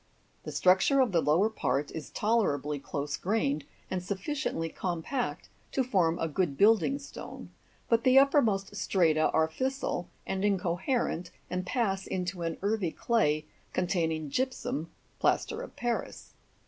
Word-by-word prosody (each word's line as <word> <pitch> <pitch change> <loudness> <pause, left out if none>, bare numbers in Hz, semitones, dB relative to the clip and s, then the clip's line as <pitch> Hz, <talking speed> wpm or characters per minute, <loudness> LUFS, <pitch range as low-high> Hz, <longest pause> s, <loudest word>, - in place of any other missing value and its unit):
The - - -4
structure 190 +9 +4
of 255 -5 +4
the 170 -3 +3
lower 165 +8 +3
part 150 -9 -1
is 160 - -6
tolerably 150 - 0
close 140 0 -3
grained, 155 -8 0 0.3
and 185 - -1
sufficiently 195 - -2
compact 180 - -3 0.3
to 265 - +2
form 180 -9 +2
a 165 - -1
good 155 -3 -1
building 220 +5 +4
stone; 280 - -9 0.4
but 230 -1 +3
the 260 +1 +5
uppermost 225 -8 +4
strata 165 -6 +2
are 160 - +3
fissile 260 -1 -2 0.2
and 190 0 -2
incoherent, 190 0 0 0.2
and 180 0 -2
pass 195 -6 0
into 180 -1 -3
an 165 -1 -2
earthy 205 -3 +1
clay 155 -11 +1 0.3
containing 160 -4 0
gypsum 250 - -2 0.3
(plaster 450 +1 +1
of - - -9
Paris). 240 -1 -3
190 Hz, 135 wpm, -30 LUFS, 165-230 Hz, 0.4 s, the